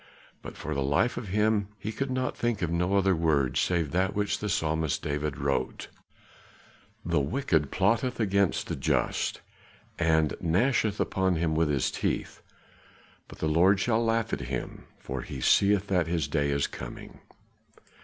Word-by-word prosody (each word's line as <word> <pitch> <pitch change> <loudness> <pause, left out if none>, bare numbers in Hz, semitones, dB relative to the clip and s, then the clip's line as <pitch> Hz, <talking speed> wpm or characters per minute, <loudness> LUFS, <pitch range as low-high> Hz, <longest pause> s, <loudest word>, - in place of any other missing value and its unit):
But - - -9
for 75 - -4
the 70 - -1
life 70 - +1
of 120 -3 -5
him 105 +1 +1
he 105 +1 -5
could 135 +5 -3 0.2
think 120 -5 -1
of 85 - -1
no 90 +3 +1
other 95 -1 +3
word 75 -6 +1
save 85 -5 +1
that 95 +2 0
which 105 0 0
the 105 - -3
psalmist 80 -4 0
David 75 -1 -2
wrote, 70 0 -2 1.2
"The 85 -3 +2
wicked 75 - 0
plotteth 115 +7 +1
against 100 -3 +1
the - - -3
just - - -1 0.6
And 80 -3 +2
gnasheth 105 +4 +1
upon 95 -1 +1
him 80 -1 0
with 80 0 +2
his 70 -3 +1
teeth, - - -3 0.9
But - - -12
the 80 - -1
Lord 90 +5 +4
shall 115 +2 +1
laugh 115 0 0
at - - 0
him, 65 -2 -5
For - - -5
he 70 - -7
seeth 100 +8 +3
that 90 -4 +2
his 80 -4 -1
day 70 -1 0
is 70 0 +1
coming." - - -9
85 Hz, 160 wpm, -28 LUFS, 75-105 Hz, 1.2 s, Lord